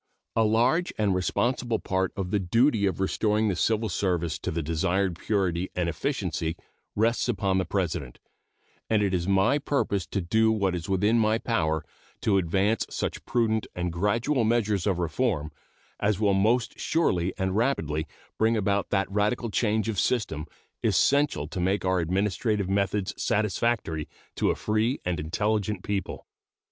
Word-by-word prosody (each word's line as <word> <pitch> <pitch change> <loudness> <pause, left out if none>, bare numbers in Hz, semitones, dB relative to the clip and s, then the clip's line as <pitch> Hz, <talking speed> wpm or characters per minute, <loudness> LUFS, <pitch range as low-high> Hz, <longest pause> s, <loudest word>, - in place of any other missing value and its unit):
A 115 - +4
large 120 +11 +2
and 105 -3 +2
responsible 120 +5 0
part 95 -2 -1
of 95 -2 -3
the 105 - +2
duty 110 +3 +2
of 95 - -2
restoring 105 +3 +1
the 95 - 0
civil 110 +4 +1
service 90 -5 -1
to - - -3
the 80 0 -2
desired 90 +4 0
purity 95 -4 0
and 90 -2 0
efficiency 85 - -2 0.4
rests 115 +3 +1
upon 95 -4 +1
the 95 - 0
President, 80 -10 -2 0.7
and 110 -2 +3
it 100 -2 0
is 90 -1 0
my 100 +9 +3
purpose 135 - -1
to 100 - -2
do 110 +5 +2
what 100 -4 +1
is 85 +1 -4
within 105 +5 +3
my 110 0 +3
power 80 -10 -1 0.4
to 100 -3 +3
advance 95 +5 +1
such - - -3
prudent 110 -2 +1
and 90 -1 -2
gradual 115 - +1
measures 110 -4 +1
of 95 -4 +1
reform 85 - -1 0.5
as 105 -1 +1
will 105 -2 +3
most 110 +5 +1
surely 95 - +1
and 95 -1 -1
rapidly 80 - 0 0.3
bring 110 +1 +3
about 100 -1 0
that 95 -1 +1
radical 105 +3 0
change 110 0 +1
of 105 -4 -1
system 85 -11 -1 0.4
essential 140 - +2
to 85 - -5
make 95 +2 0
our 95 0 +2
administrative 100 +4 0
methods 100 0 0
satisfactory 105 -6 0 0.3
to - - +1
a - - +1
free 110 +5 0
and 90 -3 -1
intelligent 105 +5 -1
people. 100 -1 -3
100 Hz, 155 wpm, -27 LUFS, 90-110 Hz, 0.7 s, A